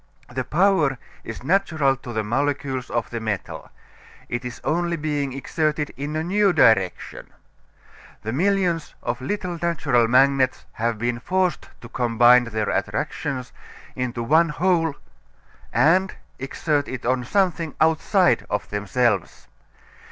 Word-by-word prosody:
The 130 +1 -2
power 160 -4 +2 0.3
is - - -8
natural 160 -4 +2
to 125 -1 -9
the 110 -2 -1
molecules 135 +2 -2
of 120 -2 -2
the 120 - -3
metal. 110 -4 -4 0.6
It 120 +1 -3
is 125 -1 -7
only 170 +1 0
being 145 -3 -2
exerted 150 +2 -2
in 145 +4 -5
a 155 - -1
new 195 +2 +2
direction. 110 - +2 1.0
The 110 +2 -3
millions 180 0 0
of 120 +2 -3
little 180 +3 -3
natural 145 -9 +2
magnets 130 +1 +3
have 115 0 -2
been 120 +1 -2
forced 185 +5 -1
to 120 - -10
combine 120 +1 +4
their 110 -2 -2
attractions 130 -3 -3 0.4
into 125 -2 -3
one 160 +7 +4
whole 165 -1 +1 0.8
and 185 +4 +3 0.2
exert 145 +2 -1
it 130 -2 -6
on 125 +1 +1
something 170 - 0
outside 160 +4 +3
of 105 0 -2
themselves. 105 +3 -1
140 Hz, 130 wpm, -23 LUFS, 120-165 Hz, 1.0 s, combine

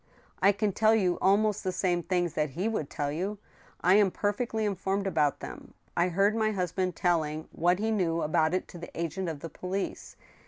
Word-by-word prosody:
" - - -32
I 195 +2 +6
can 205 +1 0
tell 220 +3 +4
you 185 -5 +1
almost 205 +2 +3
the 185 - 0
same 180 -1 0
things 175 -2 0
that 150 -1 0
he 175 +10 -2
would 215 -11 -2
tell 145 -1 -2
you. 190 +7 -3 0.4
I 180 - +5
am 205 -2 +5
perfectly 215 +3 -1
informed 195 0 -1
about 155 -6 +1
them. - - -9 0.2
I 175 - +3
heard 195 +4 +2
my 220 -1 +2
husband 180 -1 -1
telling 155 -3 0
what 175 +2 +2
he 220 +2 0
knew 170 -6 +1
about 155 +2 +2
it 185 - -2
to 175 - -10
the 170 - -8
agent 170 +2 -2
of 150 -3 -6
the 165 - -6
police. 190 +4 -4
185 Hz, 205 wpm, -29 LUFS, 170-205 Hz, 0.4 s, I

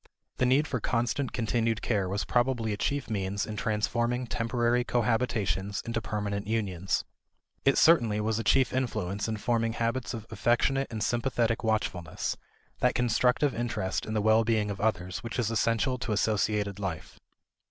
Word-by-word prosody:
The 125 - +2
need 140 +4 +3
for 125 - -2
constant 120 +4 -1
continued 115 -1 0
care 100 -5 0
was 100 +2 -2
probably 120 -3 +1
a - - -4
chief 140 +7 -1
means 100 -2 -2
in 110 - -6
transforming 120 +3 0
temporary 120 +1 0
cohabitations 110 -6 0
into 115 -1 -2
permanent 100 0 -3
unions. 95 -5 -1 0.6
It 135 - +4
certainly 115 -11 +5
was 110 +1 0
a - - -2
chief 130 +3 +3
influence 105 -6 -1
in 110 -1 -2
forming 115 0 0
habits 120 +2 -2
of 110 -2 -7
affectionate 135 +3 +1
and 110 -2 -3
sympathetic 120 0 0
watchfulness; 100 -7 -1 0.4
that - - +2
constructive 125 +3 +2
interest 115 -5 -2
in 110 - -3
the 105 - +2
well 110 +1 +5
being 110 -2 +1
of 100 - -6
others 90 -4 -1
which 115 +2 -5
is 115 -3 0
essential 115 +3 +1
to 115 -3 -2
associated 105 -1 0
life. 90 -6 -5
115 Hz, 160 wpm, -29 LUFS, 105-120 Hz, 0.6 s, certainly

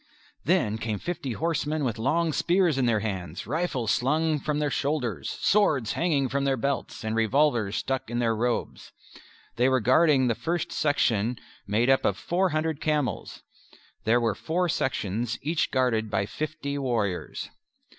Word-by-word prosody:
Then 110 +1 +2
came 110 -2 -2
fifty 140 - -4
horsemen 155 0 -1
with 115 -4 -2
long 160 +7 +1
spears 175 -5 +2
in 125 - +2
their 110 -3 +2
hands, 95 -5 -4
rifles 135 - -1
slung 155 +4 +1
from 150 +1 -2
their 150 -1 0
shoulders, 125 - -1
swords 195 - +2
hanging 150 -6 +1
from 140 +2 -1
their 135 -1 +1
belts, 140 -1 -2
and 110 0 -2
revolvers 115 -2 +2
stuck 135 -1 -2
in 120 - -2
their 115 -2 +1
robes. 120 +2 -2 0.7
They 125 +2 +4
were 130 0 +3
guarding 130 +3 +4
the 120 - +2
first 170 +8 -2
section 120 -6 +1 0.3
made 110 +4 +2
up 135 0 +4
of 100 - +1
four 185 +2 0
hundred 155 -1 -1
camels. 150 - -2 0.6
There 115 +2 +3
were 115 -3 +1
four 175 - -1
sections, 120 - -1
each 160 +3 0
guarded 115 -4 +1
by 100 -1 0
fifty 145 +3 -4
warriors. 110 -9 -2
130 Hz, 155 wpm, -26 LUFS, 115-155 Hz, 0.7 s, They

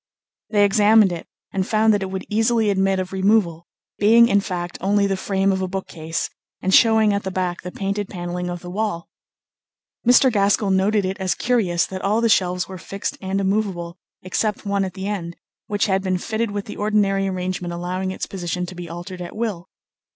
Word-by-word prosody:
They 205 -2 +4
examined 210 0 +5
it 170 -1 -6 0.3
and 190 -1 -1
found 220 0 +3
that 205 - +1
it 190 - -3
would 190 0 -5
easily 225 0 +2
admit 195 0 +1
of 185 0 -4
removal, 190 -4 +1 0.3
being, 230 +3 +6
in 200 - +4
fact, 175 -3 -5
only 200 +2 +2
the 195 -1 0
frame 195 0 0
of 190 0 -1
a 185 - -1
bookcase, 165 -4 -4 0.3
and 190 - -1
showing 220 -2 +5
at 200 - 0
the 190 - -4
back 185 -2 -2
the 180 - -7
painted 200 +1 -3
panelling 180 -1 -4
of 175 -1 -5
the 175 - -8
wall. 205 -4 -3 0.9
Mr. 250 +2 +5
Gaskell 200 0 +2
noted 195 +2 +2
it 190 +1 -3
as 190 -1 0
curious 195 -9 +1
that 185 -1 -6
all 210 +3 +1
the 230 0 +2
shelves 180 -3 +2
were 190 -1 -8
fixed 195 +3 -4
and 190 0 -1
immovable 190 -4 -1 0.2
except 210 +4 -1
one 200 -1 0
at 185 - -7
the 190 - -5
end, 175 -5 -4 0.3
which 205 -1 0
had 190 -1 +1
been 185 -1 0
fitted 220 +4 -2
with 205 0 -4
the - - -8
ordinary 205 -2 +1
arrangement 185 -1 -3
allowing 180 +2 -3
its 190 - -4
position 180 -1 -3
to 180 - -8
be 175 -2 -8
altered 175 +2 -7
at 175 - -7
will. 210 -6 -3
195 Hz, 200 wpm, -22 LUFS, 180-210 Hz, 0.9 s, being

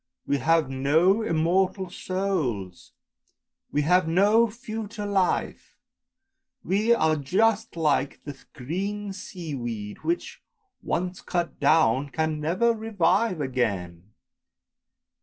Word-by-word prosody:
We 140 - 0
have 160 +2 +2
no 155 +10 +2
immortal 185 +1 0
souls, 160 - -3 0.8
we 145 - +1
have 180 +2 +3
no 205 +7 +4
future 220 -1 -6
life, 195 -3 -1 0.9
we 205 +6 +1
are 160 -9 +3
just 210 +10 +1
like 145 -4 +1
the 145 -1 -7 0.2
green 195 +9 -4
sea 175 -5 -7
weed, 115 -5 -5
which, 345 +1 -3 0.4
once 180 +1 -3
cut 170 -5 -3
down, 145 -2 +3
can 160 +1 -1
never 185 +10 +2
revive 200 -4 +1
again! 100 -8 -3
170 Hz, 100 wpm, -25 LUFS, 140-200 Hz, 0.9 s, no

